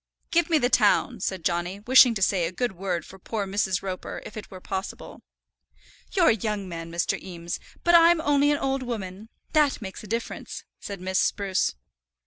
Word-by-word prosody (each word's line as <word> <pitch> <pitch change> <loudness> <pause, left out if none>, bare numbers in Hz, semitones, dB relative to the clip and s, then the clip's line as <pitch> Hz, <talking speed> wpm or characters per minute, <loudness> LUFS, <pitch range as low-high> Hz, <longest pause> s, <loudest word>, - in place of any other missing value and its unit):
"Give 340 0 +2
me 325 - +4
the 245 - +2
town," - - +3
said 185 -4 -3
Johnny, 175 +3 -1
wishing 250 +1 +7
to 195 - 0
say 180 -3 +2
a - - -5
good 240 +6 -1
word 180 -3 -3
for 190 - -13
poor 210 +2 -3
Mrs. 190 -1 0
Roper, 185 -2 -5
if - - -9
it 215 - -8
were 185 - -10
possible. 190 +1 -6 0.9
"You're 365 -4 +5
a - - +4
young 210 -2 -3
man, 165 -1 -7
Mr. 170 +1 -1
Eames; 170 -2 -6 0.2
but 345 - +3
I'm 340 0 +7
only 290 -2 +3
an 290 - +2
old 270 -1 -1
woman. 215 -4 -6 0.2
That 300 -3 +3
makes 195 -3 -8
a - - -9
difference," 230 +3 -4 0.2
said 200 -3 -7
Miss 185 0 0
Spruce. 195 - 0
200 Hz, 190 wpm, -26 LUFS, 185-255 Hz, 0.9 s, wishing